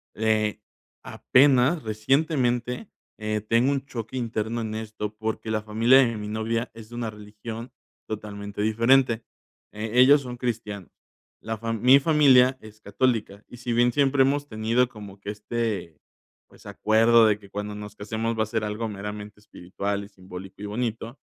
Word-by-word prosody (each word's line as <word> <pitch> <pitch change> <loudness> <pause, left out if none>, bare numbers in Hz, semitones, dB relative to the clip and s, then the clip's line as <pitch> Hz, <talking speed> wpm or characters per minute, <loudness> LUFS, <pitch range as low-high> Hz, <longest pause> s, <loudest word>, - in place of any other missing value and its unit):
eh, 110 -1 +1 0.4
apenas 135 +4 +3
recientemente, 125 - 0 0.3
eh, 110 -1 -2
tengo 115 +6 +2
un 140 -1 -2
choque 120 -1 -6
interno 115 -1 -2
en 110 -1 -4
esto, 110 -1 -5
porque 110 0 -4
la 110 - 0
familia 115 +5 +4
de 115 -4 +2
mi 105 - -6
novia 115 +2 -2
es 115 0 -13
una 120 -2 -4
religión 110 +3 -9 0.4
totalmente 105 -1 -6
diferente. 115 +2 +3 0.5
Eh, 105 +1 -5
ellos 140 +3 +7
son 125 -2 -7
cristianos. 110 -6 -4 0.5
La 110 0 -4
fa 115 +1 -4
mi 125 +5 +6
familia 135 -4 +5
es 110 0 -14
católica, 105 -2 -1
y 120 - -12
si 120 0 -4
bien 120 +1 +3
siempre 140 -1 +3
hemos 145 +2 0
tenido 115 +2 +1
como 105 -4 -11
que 100 - -7
este, 105 -6 -3 0.5
pues, - - -20
acuerdo 115 +1 +4
de 105 -1 +2
que 100 -2 -16
cuando 105 +1 -5
nos 105 0 -9
casemos 110 +2 -3
va 110 - +2
a - - -2
ser 110 0 -2
algo 110 +2 -3
meramente 105 +1 -7
espiritual 100 0 -5
y 100 - -12
simbólico 95 0 -11
y 105 - -5
bonito, 115 +3 -4
110 Hz, 160 wpm, -25 LUFS, 105-120 Hz, 0.5 s, ellos